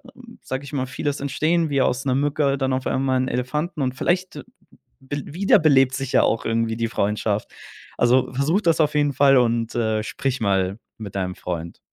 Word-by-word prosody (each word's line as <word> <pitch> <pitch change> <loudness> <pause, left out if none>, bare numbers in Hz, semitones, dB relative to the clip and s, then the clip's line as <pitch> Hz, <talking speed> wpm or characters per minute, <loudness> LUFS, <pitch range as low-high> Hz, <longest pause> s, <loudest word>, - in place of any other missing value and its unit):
ähm, - - -15
sage 130 +1 -5
ich 140 +1 -11
mal, 130 -2 -1
vieles 145 +2 -3
entstehen 155 +4 0
wie 140 -2 +1
aus 130 +1 0
'ner 130 -2 +1
Mücke, 140 0 +1
dann 130 -1 0
auf 130 0 -2
einmal 130 0 0
'n 130 - 0
Elefanten 150 +7 -2
und 130 -1 -1
vielleicht 180 +5 -1 0.6
bel 140 +1 -5
wiederbelebt 155 -7 +3
sich 135 -1 -4
ja - - +5
auch 110 - 0
irgendwie 115 0 0
die 115 0 0
Freundschaft. 105 -1 -1 0.5
Also, 125 +1 +3
versuche 150 +10 +1
das 165 -1 +2
auf 150 -1 +1
jeden 145 -1 +2
Fall 135 0 +5
und, 115 -2 +1
äh, 110 -2 0
sprich 135 +4 -3
mal 95 -1 0 0.2
mit 100 -3 -9
deinem 90 -2 -2
Freund. 85 -2 -6
130 Hz, 190 wpm, -22 LUFS, 115-145 Hz, 0.6 s, ja